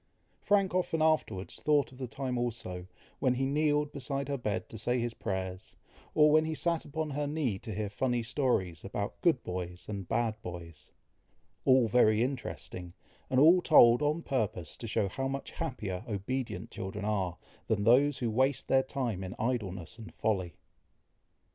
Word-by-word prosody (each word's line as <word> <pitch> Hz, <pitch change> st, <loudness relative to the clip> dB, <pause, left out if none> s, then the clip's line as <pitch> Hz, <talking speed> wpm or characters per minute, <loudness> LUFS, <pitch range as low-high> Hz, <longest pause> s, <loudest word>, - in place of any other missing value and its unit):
Frank 200 Hz, -2 st, +2 dB
often 180 Hz, -3 st, 0 dB
afterwards 155 Hz, -12 st, 0 dB
thought 150 Hz, -3 st, +2 dB
of 130 Hz, -, -15 dB
the 130 Hz, -, -3 dB
time 130 Hz, +1 st, -3 dB
also, 115 Hz, -7 st, -3 dB, 0.3 s
when 130 Hz, -2 st, +2 dB
he 135 Hz, +2 st, 0 dB
kneeled 150 Hz, +1 st, +1 dB
beside 140 Hz, 0 st, -3 dB
her 140 Hz, -, 0 dB
bed 105 Hz, -3 st, -2 dB
to 110 Hz, -, -8 dB
say 120 Hz, +4 st, 0 dB
his 120 Hz, -1 st, -1 dB
prayers, 95 Hz, -4 st, -4 dB, 0.4 s
or 150 Hz, -1 st, +6 dB
when 155 Hz, +1 st, +5 dB
he 160 Hz, 0 st, -2 dB
sat 170 Hz, +2 st, 0 dB
upon 155 Hz, +1 st, -3 dB
her 145 Hz, +1 st, -1 dB
knee 145 Hz, -10 st, -1 dB
to 110 Hz, -, -7 dB
hear 105 Hz, +1 st, -2 dB
funny 120 Hz, +3 st, -1 dB
stories 115 Hz, -, 0 dB
about 100 Hz, +1 st, -4 dB
good 160 Hz, -8 st, +3 dB
boys 90 Hz, -1 st, -5 dB
and 100 Hz, -4 st, -5 dB
bad 115 Hz, -1 st, 0 dB
boys 85 Hz, -4 st, -9 dB, 0.8 s
all 130 Hz, -3 st, +5 dB
very 110 Hz, -1 st, +4 dB
interesting, 120 Hz, -9 st, -5 dB, 0.4 s
and 130 Hz, -, +3 dB
all 170 Hz, +5 st, +7 dB
told 120 Hz, -7 st, +7 dB
on 150 Hz, +3 st, 0 dB
purpose 105 Hz, -, -2 dB
to 115 Hz, -, -7 dB
show 105 Hz, -2 st, +1 dB
how 135 Hz, +7 st, -3 dB
much 135 Hz, +1 st, -4 dB
happier 105 Hz, -7 st, -4 dB
obedient 115 Hz, +5 st, -3 dB
children 100 Hz, +2 st, -5 dB
are, 95 Hz, -4 st, -1 dB, 0.3 s
than 105 Hz, -2 st, +1 dB
those 130 Hz, +5 st, +5 dB
who 120 Hz, -3 st, -1 dB
waste 130 Hz, +4 st, +1 dB
their 135 Hz, -, +4 dB
time 125 Hz, -7 st, -3 dB
in 95 Hz, 0 st, -6 dB
idleness 110 Hz, -4 st, -3 dB
and 110 Hz, 0 st, -10 dB
folly. 95 Hz, -7 st, -1 dB
120 Hz, 170 wpm, -31 LUFS, 100-140 Hz, 0.8 s, all